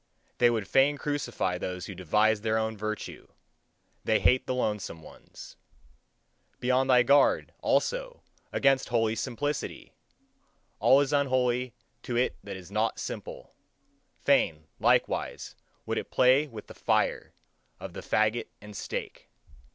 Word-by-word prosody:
They 120 - +6
would 110 -4 -1
fain 140 +2 +3
crucify 120 -11 -2
those 90 0 -4
who 95 - -7
devise 105 +4 +2
their 110 0 0
own 110 0 -1
virtue 110 0 -5 0.8
they 110 -1 +2
hate 115 +7 +3
the 130 - -1
lonesome 105 -9 -3
ones. - - -13 1.0
Be 125 +1 0
on 130 +1 +3
thy 125 -2 +5
guard, 140 +3 +3
also, - - -1 0.3
against 135 -1 +2
holy 115 -2 +1
simplicity! 135 +5 -4 0.9
All 135 +2 +6
is 145 +1 -1
unholy 130 -3 +1 0.3
to 120 - -4
it 125 - +1
that 100 -1 -7
is 95 0 -12
not 110 +2 0
simple; - - -7 0.7
fain, 80 -1 +2
likewise, - - 0 0.3
would - - -1
it - - -8
play 130 +4 +4
with 110 -6 -10
the - - -12
fire - - 0 0.4
of - - -8
the - - -7
fagot 110 +2 +1
and 105 0 -12
stake. - - -6
120 Hz, 135 wpm, -28 LUFS, 105-130 Hz, 1.0 s, They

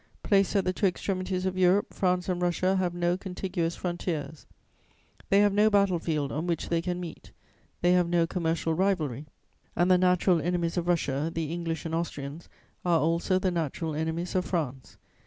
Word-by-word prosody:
Placed 195 0 +2
at 195 -2 +2
the 185 - +1
two 200 - +2
extremities 185 0 -2
of 185 0 -1
Europe, 185 +2 +3
France 180 -1 0
and 180 -1 -1
Russia 180 +2 +1
have 180 -2 -1
no 175 0 +1
contiguous 180 -2 -3
frontiers; 170 -4 -4 0.8
they 200 +1 +5
have 205 -1 +3
no 210 +2 +4
battle 200 -4 +3
field 150 -4 -2
on 160 +4 -3
which 170 -2 -2
they 170 -1 +1
can 180 +1 -3
meet, 170 -3 -8 0.5
they 175 - +4
have 180 -1 +3
no 170 -1 +3
commercial 165 -1 -1
rivalry, 155 -7 0 0.5
and 175 +2 +3
the 180 - +5
natural 180 -1 +3
enemies 175 -1 -1
of 175 -1 -1
Russia, 155 -3 0
the 165 -1 -3
English 165 -2 -3
and 165 - -4
Austrians, 160 -2 -4 0.3
are 175 -2 +3
also 170 +4 +1
the 185 0 0
natural 160 -1 -2
enemies 160 +3 -2
of 185 - +1
France. 135 - -3
175 Hz, 180 wpm, -28 LUFS, 165-185 Hz, 0.8 s, they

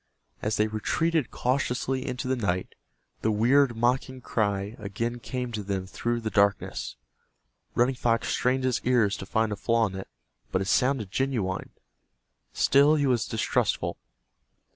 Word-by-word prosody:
As 105 0 -1
they 105 - +3
retreated 145 +7 0
cautiously 130 0 -1
into 125 0 -3
the 130 - +1
night, 95 -6 -2 0.5
the 110 - +1
weird, 120 +3 +3
mocking 130 +2 0
cry 100 -3 -1
again 115 +4 -3
came 125 0 -4
to 110 -2 -3
them 95 -2 -3
through 120 +5 -2
the 110 -1 -3
darkness. 100 -1 +1 0.8
Running 125 +3 +3
Fox 115 -2 0
strained 130 +1 +1
his 130 -2 +1
ears 120 -5 +3
to 95 - -8
find 110 +1 +1
a - - -1
flaw 115 +2 +2
in 100 - -4
it, 95 0 -6 0.4
but 95 - +1
it 95 - -2
sounded 125 -3 +1
genuine. 115 -9 -1 0.8
Still 145 +3 +4
he 145 -2 +1
was 125 -4 +1
distrustful. 110 - 0
115 Hz, 150 wpm, -27 LUFS, 105-130 Hz, 0.8 s, Still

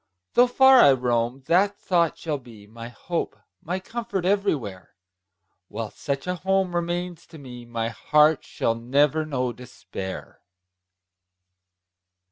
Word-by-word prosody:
Though 245 +1 +5
far 265 +1 +6
I 140 - +7
roam, 125 0 -1
that 195 +5 +2
thought 170 -3 +1
shall 150 -3 -3
be 115 -5 -15
My 115 +2 -10
hope, 170 +8 -4 0.3
my 180 +3 -3
comfort, 225 -2 -4
everywhere; 150 - -1 0.7
While 110 +1 -6
such 140 -1 -4
a 180 0 -2
home 190 0 0
remains 175 0 -3
to 165 - -13
me, 125 -4 -10
My 115 -1 -2
heart 150 +5 +3
shall 115 - -1
never 145 +6 +1
know 130 -4 -2
despair! 100 -5 -9
150 Hz, 125 wpm, -24 LUFS, 120-180 Hz, 0.7 s, I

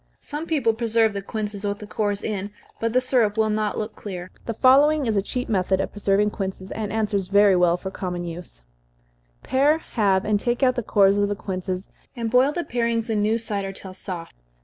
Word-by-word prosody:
Some 300 +3 -5
people 275 -8 +2
preserve 225 -1 +2
the 200 - -3
quinces 210 0 -4
with 205 0 -1
the 210 - -9
cores 205 -1 -2
in, 205 -2 -3 0.3
but 230 0 0
the 250 - +4
syrup 240 -5 +2
will 220 -1 +2
not 210 -1 -1
look 215 +1 -4
clear. 185 -3 -7 0.2
The 230 - -2
following 285 +4 +5
is 225 -2 0
a 200 - +3
cheap 250 +5 -4
method 190 -2 +1
of 195 - -2
preserving 205 0 +1
quinces, 190 -1 -5
and 215 -2 -4
answers 205 -3 -1
very 200 0 +5
well 175 -1 +3
for 190 +1 -6
common 180 -2 -4
use: 165 - -9 0.8
Pare, 285 +4 +3
halve, 200 -10 0
and 210 -1 +2
take 240 +4 -1
out 255 -1 +5
the 245 - -1
cores 200 -2 +3
of 205 - +2
the 205 - -1
quinces, 185 -1 -4 0.3
and 230 -2 -3
boil 255 +3 +4
the 345 +3 -2
parings 230 -2 -1
in 210 -1 +1
new 215 +2 +2
cider 205 -4 -2
till 190 -1 -9
soft. 180 -3 -6
210 Hz, 210 wpm, -23 LUFS, 195-230 Hz, 0.8 s, following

